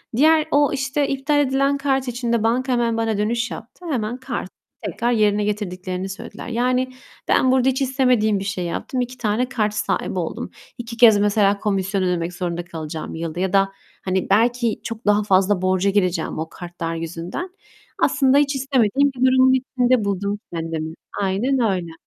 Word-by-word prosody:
Diğer 310 +3 +5
o, 290 +1 +4
işte, 275 +1 0
iptal 275 +2 0
edilen 275 0 +2
kart 270 -2 0
için 240 -1 -2
de 230 -2 +1
banka 255 +3 +1
hemen 235 -1 +1
bana 225 -2 0
dönüş 230 +3 -1
yaptı. 240 +10 -10
Hemen 240 -3 -2
kartı 250 -7 -5 0.4
tekrar 235 +1 -1
yerine 210 -2 +2
getirdiklerini 185 -2 -3
söylediler. 195 - -8
Yani, 250 +2 0 0.3
ben 255 - +3
burada 260 0 +3
hiç 265 +1 -1
istemediğim 250 -6 +2
bir 195 - -4
şey 190 -3 -3
yaptım. 250 +8 -3
2 250 +1 -5
tane 240 +3 0
kart 215 -5 0
sahibi 200 -3 -1
oldum. 165 - -4 0.3
2 230 -1 -7
kez 225 -3 +7
mesela 205 -1 +2
komisyon 195 -1 -1
ödemek 175 -1 -1
zorunda 175 -1 -3
kalacağım 160 -2 -6
yılda. 165 +1 -4
Ya 190 0 -1
da, 195 0 +3 0.3
hani, 185 0 -1
belki 235 +2 +2
çok 230 0 -6
daha 210 0 +3
fazla 190 -1 +2
borca 185 +1 +2
gireceğim 185 -6 0
o 160 +1 -4
kartlar 170 -2 -6
yüzünden. 170 - -5 0.5
Aslında 275 -1 +4
hiç 285 -1 +2
istemediğim 270 0 +2
bir - - -11
durumun 260 0 +5
içinde 255 -3 +1
buldum 200 +1 -2
kendimi. 160 -1 -4 0.3
Aynen 220 +8 +1
öyle. 170 -3 -3
220 Hz, 170 wpm, -21 LUFS, 190-255 Hz, 0.5 s, kez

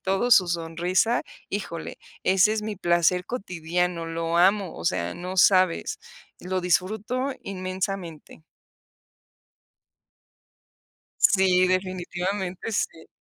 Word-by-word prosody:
todo 195 +6 0
su 190 -6 +7
sonrisa, 175 +6 0 0.3
¡híjole!, 180 -5 -5 0.2
ese 190 +3 +4
es 215 -1 -2
mi 215 -1 -4
placer 175 0 +2
cotidiano, 180 -5 -2
lo 165 0 -2
amo, 190 +1 +3
o 80 - -8
sea, 85 +1 0
no 180 +2 -6
sabes, 185 - +3 0.4
lo 185 +1 -3
disfruto 215 +9 0
inmensamente. 185 -4 -5 2.8
Sí, 185 -2 +4
definitivamente 185 +2 -2
sí. 165 -5 -3
185 Hz, 95 wpm, -25 LUFS, 175-195 Hz, 2.8 s, su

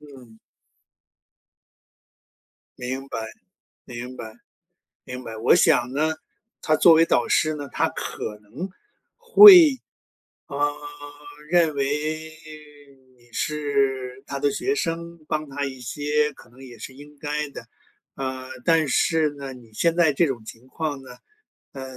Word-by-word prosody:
嗯。 130 -6 -16 2.4
明 130 +2 -5
白， 115 - -5 0.7
明 125 +1 -8
白， 110 -2 -8 0.7
明 125 0 -8
白。 110 -1 -8
我 115 +9 +4
想 130 -8 +3
呢， 155 +2 0 0.5
他 155 - +2
作 165 +1 +6
为 165 +1 +5
导 - - +1
师 155 0 +2
呢， 145 -2 -7
他 - - +1
可 105 -1 -6
能， 115 - -7 1.8
会， 140 - -9
啊， 145 0 +2 0.8
认 170 -3 +3
为 140 -1 0 1.3
你 120 0 -25
是 135 -3 -2
他 140 - -4
的 145 +1 +1
学 410 - -1
生， 170 - -4
帮 155 -1 -3
他 145 +1 -3
一 130 -1 -7
些， 150 +4 -1
可 120 - -18
能 130 +2 -15
也 120 -3 -12
是 130 +4 -9
应 145 +2 -15
该 150 0 -3
的。 - - -10 0.5
呃， 130 -1 -5 0.2
但 165 -3 +3
是 155 +3 +2
呢， 140 -2 -8
你 115 -3 -16
现 170 +7 +1
在 165 -4 +3
这 165 +4 +2
种 120 -5 -5
情 120 +4 -12
况 150 -1 -4
呢， 125 -2 -13 0.6
呃， 135 -1 -7
140 Hz, 145 characters per minute, -23 LUFS, 125-155 Hz, 2.4 s, 作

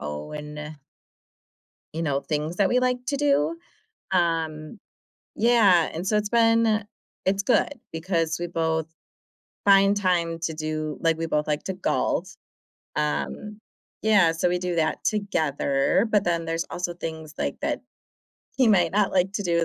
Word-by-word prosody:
own 150 - -6 1.2
you 165 - -3
know, 140 -3 0
things 155 +3 -3
that 195 -1 +3
we 250 - +3
like 250 0 +1
to 280 - 0
do, 290 +3 +2 0.6
um, 165 0 -1 0.6
yeah, 215 -8 +4
and 170 +4 -5
so 210 - +2
it's 210 0 0
been 225 -2 +3 0.4
it's 195 +1 +1
good 245 - +3 0.2
because 165 -1 -1
we 175 - -3
both 160 -2 -1 0.8
find 195 0 +5
time 175 -4 +1
to 165 -1 -2
do 155 -1 -3
like, 165 -1 +2
we 165 - -2
both 150 -2 -1
like 150 0 -1
to 190 - -3
golf. 185 - -1 0.6
Um, 75 - -2 0.4
yeah, 205 -6 +4
so 165 +2 0
we 180 - 0
do 180 -1 -2
that 160 -1 0
together, 160 -3 +1
but 210 -2 +3
then 170 -2 0
there's 165 0 -2
also 175 0 -3
things, 160 -2 -7
like, - - -3
that - - -1 0.8
he 255 -3 +4
might 175 -6 +3
not 205 0 +2
like 185 +1 +2
to 205 - -1
do, 170 -2 +1
170 Hz, 155 wpm, -25 LUFS, 160-205 Hz, 1.2 s, find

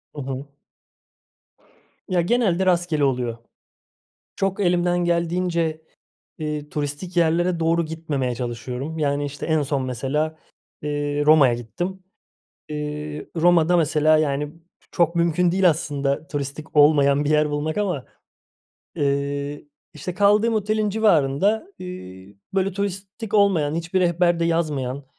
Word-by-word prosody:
Hı 145 - -5
hı. 135 +1 -5 1.6
Ya, 180 -2 +2
genelde 190 -2 +1
rastgele 175 -4 +1
oluyor. 125 -4 0 1.0
Çok 195 0 -1
elimden 175 -1 +2
geldiğince, 170 -2 0 0.6
ııı, 150 -1 -3
turistik 150 +5 -4
yerlere 170 +1 +2
doğru 165 +1 +2
gitmemeye 150 -6 -2
çalışıyorum. 125 +5 -5
Yani, 145 -1 0
işte, 145 0 -5
en 160 -2 +2
son, 140 -1 -1
mesela, 150 +6 -2 0.5
ııı, 145 0 -1
Roma'ya 145 -6 +6
gittim. 175 - -5 0.7
Iıı, 150 0 -5
Roma'da, 175 +1 +4
mesela, 155 -1 +3
yani, 145 0 -1 0.4
çok 170 0 +1
mümkün 170 +1 +2
değil 185 -2 +5
aslında 145 -1 -2
turistik 145 0 -5
olmayan 145 -1 +5
bir 145 - 0
yer 150 -1 +3
bulmak 155 +5 -2
ama, 180 -10 -1 0.9
ııı, 140 0 -1 0.3
işte, 170 +4 -6
kaldığım 210 +3 +3
otelin 215 0 0
civarında, 205 - +2
ııı, 100 - -9 0.2
böyle, 195 0 +1
turistik 200 +2 -5
olmayan, 175 -8 +3
hiçbir 170 +3 -1
rehberde 175 -1 +2
yazmayan, 145 -5 -1
155 Hz, 115 wpm, -23 LUFS, 145-175 Hz, 1.6 s, Roma'ya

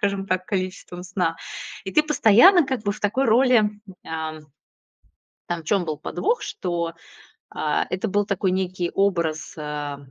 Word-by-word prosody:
скажем 200 -1 -1
так, 185 -1 -1
количеством 185 -2 -4
сна. 180 -3 -1 0.5
И 190 - -5
ты 305 - +5
постоянно, 300 - +6
как 260 -4 -2
бы, 205 - +1
в - - -11
такой 235 +7 +1
роли, 235 -2 +4 0.4
а, 160 -1 -4
м, 150 -1 -14 1.0
там 175 -1 -3
в - - -22
чём 195 -2 +1
был 155 -2 -3
подвох, 465 +5 -1
что, 170 -2 -3 0.6
а, 150 -1 0
это 185 +4 -1
был 205 +1 +1
такой 195 -2 0
некий 185 -1 -1
образ, 170 -6 0
э, 150 -1 -4
185 Hz, 160 wpm, -23 LUFS, 170-210 Hz, 1.0 s, постоянно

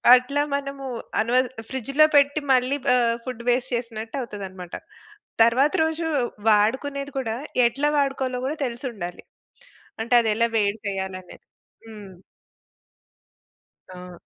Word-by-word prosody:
అట్లా 280 +3 0
మనము 275 -1 -5 0.4
అనవ 235 +3 0 0.3
ఫ్రిడ్జ్‌లో 275 +4 +3
పెట్టి, 285 +2 +3
మళ్ళీ 255 +3 +2 0.2
ఆహ్, 235 -1 +2
ఫుడ్ 245 -2 -6
వేస్ట్ 245 +1 0
చేసినట్టు 230 0 -5
అవుతదన్నమాట. 190 -6 -8 0.7
తరువాత 260 +6 +3
రోజు 320 +1 -1 0.4
వాడుకునేది 275 +7 +1
కూడా, 225 -3 -2 0.3
ఎట్లా 280 +5 0
వాడుకోవాలో 270 -2 0
గూడా 295 +3 -2
తెలిసుండాలి. 235 -7 -6 0.8
అంటే 235 +2 -2
అది 225 - 0
ఎలా 230 +1 +2
వేడి 205 +1 +1
చేయాలనేది. 190 -2 -6 0.4
హ్మ్. 205 -4 -11 1.8
ఆ! 180 0 -10
240 Hz, 110 wpm, -24 LUFS, 215-275 Hz, 1.8 s, ఫ్రిడ్జ్‌లో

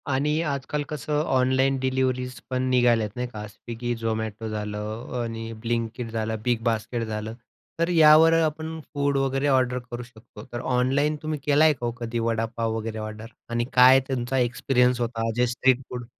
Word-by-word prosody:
आणि 150 +4 +1
आजकाल 145 -1 -2
कसं 150 0 -2
ऑनलाईन 130 -1 +2
डिलिव्हरीज 130 -1 -1
पण 130 0 -1
निघाल्यात 120 -4 +3
नाही 125 0 -2
का. 105 -3 -7
स्विगी, 120 +3 -5
झोमॅटो 110 -1 -3
झालं 105 +1 -4 0.2
आणि 115 -1 -5
अ, - - -7
ब्लिंक 115 0 -1
किट 120 -2 -5
झालं, 110 0 -2
बिग 120 -2 +1
बास्केट 115 +1 -1
झालं. 110 0 -4 0.5
तर 170 +1 +1
यावर 160 -1 +7
आपण 160 +1 -2
फूड 140 -1 +1
वगैरे 135 +1 0
ऑर्डर 130 -2 +2
करू 120 0 -5
शकतो. 110 -3 -14
तर 120 - -3
ऑनलाईन 135 +5 +1
तुम्ही 155 -1 -3
केल 145 0 +3
आहे 155 -1 +6
का 120 -3 -6
हो 120 - 0
कधी 120 0 -3
वडापाव 115 0 -1
वगैरे 110 0 -4
ऑर्डर. 110 +1 -6 0.2
आणि 120 0 0
काय 130 +1 +8
तुमचा 130 0 -1
एक्सपिरियन्स 125 0 +2
होता 115 -1 -1
जे 125 +1 +2
स्ट्रीट 130 +1 +2
फूड 125 -1 -6
125 Hz, 175 wpm, -25 LUFS, 115-135 Hz, 0.5 s, काय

